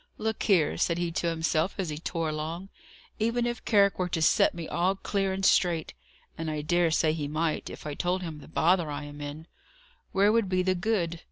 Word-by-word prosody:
"Look 220 -1 -2
here," 180 -8 +2
said 170 - +1
he 175 -1 -1
to 170 - -1
himself, 165 +1 0
as 190 -4 -2
he 150 0 -4
tore 165 -1 -2
along, 160 +5 -4 0.5
"even 230 +2 +1
if 240 -1 -3
Carrick 200 -3 +4
were 180 -1 0
to 165 -2 -1
set - - +4
me 170 -2 -5
all 180 +3 +1
clear 195 0 -1
and 190 0 -2
straight 170 -5 +2 0.5
and 165 -1 -2
I 150 -1 -3
dare 175 +2 +2
say 155 -1 +2
he 150 -3 -3
might, 155 +2 -1
if - - -10
I 150 - -3
told 180 +4 -1
him 160 -3 -6
the - - -13
bother 170 +1 +2
I 145 0 -4
am 145 0 -9
in 145 +2 -7 0.7
where 200 +2 +4
would 225 -3 +2
be 185 -1 +1
the 185 0 +2
good? 175 -3 -1
170 Hz, 215 wpm, -28 LUFS, 155-190 Hz, 0.7 s, Carrick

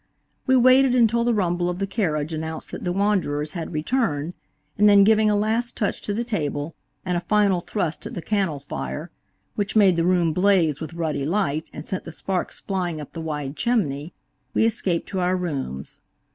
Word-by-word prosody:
We 260 - +5
waited 255 +1 +5
until 235 -1 +3
the 240 0 +2
rumble 175 -3 0
of 180 - -3
the 195 - -1
carriage 165 -7 -1
announced 160 0 -4
that - - -6
the 180 - -1
wanderers 175 -7 0
had 170 -3 -5
returned, 160 - -1 0.4
and 210 0 +5
then 200 -1 +7
giving 215 +1 +4
a 210 - +3
last 225 +3 0
touch 205 - -1
to - - -3
the 220 +4 -1
table, 155 -9 -3 0.3
and 180 -1 0
a - - +1
final 200 -1 +2
thrust 175 -5 -3
at - - -8
the 175 - -4
cannel 195 -8 0
fire, 65 - -6 0.4
which 205 +1 -2
made 195 -5 +5
the 165 - +2
room 175 -2 +2
blaze 180 -5 +2
with 160 +1 -6
ruddy 155 -4 -2
light 160 -2 -1
and - - -8
sent 190 - -4
the 165 - -8
sparks 185 +3 -3
flying 180 -5 -2
up 150 - -9
the 165 - -5
wide 150 -3 -4
chimney, 165 - 0 0.4
we - - +4
escaped 190 -6 0
to 190 - -2
our 180 +1 +1
rooms. 135 - -4
180 Hz, 195 wpm, -23 LUFS, 155-210 Hz, 0.4 s, then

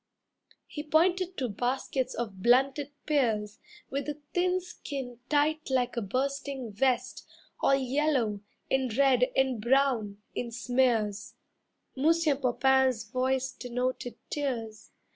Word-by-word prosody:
He 295 - -6
pointed 355 +4 +2
to 260 - -1
baskets 250 +4 -2
of 210 -5 -5
blunted 265 +5 +3 0.2
pears 220 -8 0 0.3
With 275 +1 -2
the 295 0 -4
thin 360 +1 +2
skin 270 -8 -7
tight 305 +1 +1
like 250 -2 +1
a 235 - -1
bursting 265 +2 -2
vest, 250 +3 0 0.4
All 275 - +4
yellow, 265 -5 +1 0.3
and 265 -2 +1
red, 260 -3 +4
and 265 -4 +1
brown, 240 -4 +2 0.2
in 240 - -3
smears. 230 -4 0 0.6
Monsieur 315 +2 +3
Popain's 265 -2 +2
voice 260 +1 0
denoted 250 -1 -3
tears. 235 -7 -3
260 Hz, 115 wpm, -29 LUFS, 240-280 Hz, 0.6 s, All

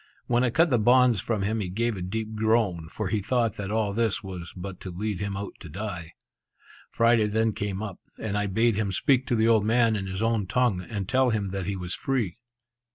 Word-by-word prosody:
When 120 0 +2
I 125 - +3
cut 160 +7 +3
the 120 - +4
bonds 125 -1 +5
from 110 -4 -1
him 110 +3 0
he 95 -4 -3
gave 115 +4 -1
a 95 - -6
deep 110 +4 -3
groan, 110 -7 +1
for 105 +2 -3
he 105 +1 0
thought 115 +1 0
that 100 -1 -4
all 105 -2 0
this 110 -1 0
was 90 -3 -7
but 90 0 -7
to 95 - -7
lead 100 +2 -3
him 100 -1 -3
out 100 0 -5
to 85 - -10
die. 90 -2 -6 0.8
Friday 115 -2 +3
then 110 +1 +1
came 100 0 -3
up, 100 -4 -6 0.2
and 110 -2 -3
I 105 0 0
bade 110 +2 +2
him 105 -3 0
speak 130 +7 +2
to 120 - +1
the 110 0 +3
old 110 -3 +4
man 115 0 +3
in 100 -2 -3
his 95 +3 -3
own 115 -4 +1
tongue, 120 -5 +1
and 100 -2 -5
tell 130 +3 +3
him 105 -4 -1
that 95 -1 -4
he 100 - -1
was 90 -1 -5
free. 120 -6 -1
105 Hz, 230 wpm, -26 LUFS, 95-115 Hz, 0.8 s, bonds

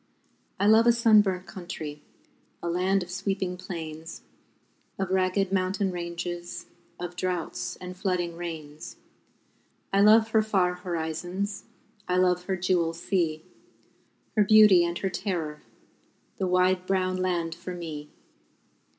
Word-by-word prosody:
I 200 - +2
love 220 +2 +6
a - - +8
sunburnt 210 -5 +4
country, 160 -7 -7 0.6
A - - -2
land 185 +3 +1
of 175 - -10
sweeping 190 -1 -2
plains, 165 -3 -7 0.7
Of 195 -1 -2
ragged 190 +1 +1
mountain 190 +1 0
ranges, 175 0 -5 0.3
Of 175 0 -5
droughts 180 -2 -3
and 180 0 -8
flooding 180 -2 -1
rains. 160 -3 -7 1.0
I 195 - +4
love 220 +2 +6
her 220 -1 +4
far 190 -4 +1
horizons, 180 +3 -4 0.4
I 180 - +1
love 180 -1 +2
her 190 0 -1
jewel 175 -2 +1
sea, 165 -2 -1 0.9
Her 210 - +5
beauty 210 -3 +7
and 170 0 -1
her 195 - -1
terror 175 -5 -3 0.8
The 190 - -1
wide 185 0 +2
brown 185 -1 +1
land 175 -3 -1
for 175 +2 -7
me! 155 -4 -7
180 Hz, 125 wpm, -27 LUFS, 170-195 Hz, 1.0 s, a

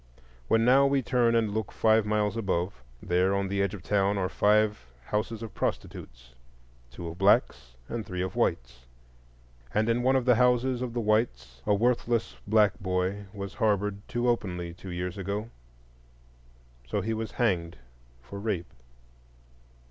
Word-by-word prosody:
When 115 0 +3
now 135 +3 +6
we 135 -1 +1
turn 120 -1 +2
and 110 -3 +1
look 110 -2 -2
five 110 -1 +3
miles 105 0 +1
above, 95 - -2 0.2
there 90 +2 +2
on 100 0 0
the 100 0 0
edge 100 +1 0
of 95 - -11
town 100 0 +1
are 95 -1 0
five 105 -5 +2 0.2
houses 110 - -2
of 110 - -7
prostitutes,—two - - -7
of 85 +2 -8
blacks 85 - +2
and 115 -1 -4
three 90 -2 -4
of 95 - -5
whites; - - -2 0.9
and 110 +1 +2
in 115 +1 +2
one 130 +2 +3
of 130 -2 +1
the 125 - +6
houses 125 +1 +2
of 125 -2 -3
the 120 - -1
whites 65 - 0
a 105 - +4
worthless 120 +1 0
black 105 0 +3
boy 95 +1 -1
was 100 -2 -6
harbored 105 -2 0
too 120 +1 -1
openly 90 -7 -1
two 90 +2 -10
years 90 +2 -4
ago; 100 +4 -4 1.4
so 100 - -1
he 110 +4 -2
was 110 -2 -4
hanged 90 -8 0 0.5
for 100 +11 -8
rape. 100 - -3
105 Hz, 155 wpm, -28 LUFS, 90-115 Hz, 1.4 s, now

